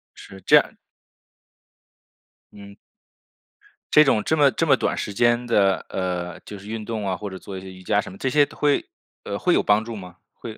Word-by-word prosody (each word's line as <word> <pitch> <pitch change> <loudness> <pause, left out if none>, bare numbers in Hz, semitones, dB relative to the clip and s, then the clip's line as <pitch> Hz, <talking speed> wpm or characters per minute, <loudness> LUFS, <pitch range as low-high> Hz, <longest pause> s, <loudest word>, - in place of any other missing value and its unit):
是， 95 0 -13
这 - - +5
样 - - 0 1.8
嗯。 100 -1 -13 1.2
这 150 0 +7
种 110 -6 +2
这 160 - 0
么 145 -2 +5
这 - - -1
么 - - +4
短 - - -1
时 105 - -4
间 120 +3 +2
的， 100 -5 +2
呃， 90 -2 -3
就 105 - -8
是 100 +1 -13
运 110 -1 -5
动 110 -3 -4
啊， 95 -1 -2
或 105 - -6
者 95 - -8
做 95 0 -9
一 95 - -7
些 95 0 -10
瑜 95 - -14
伽 105 +3 +1
什 - - -4
么， 95 - -12
这 135 - -1
些 145 +2 +4
会 145 0 0 0.4
呃， - - -3
会 - - +1
有 - - +3
帮 105 +1 +2
助 115 -1 -7
吗？ 90 -3 -11 0.2
会 110 -1 -10
105 Hz, 220 characters per minute, -23 LUFS, 95-120 Hz, 1.8 s, 这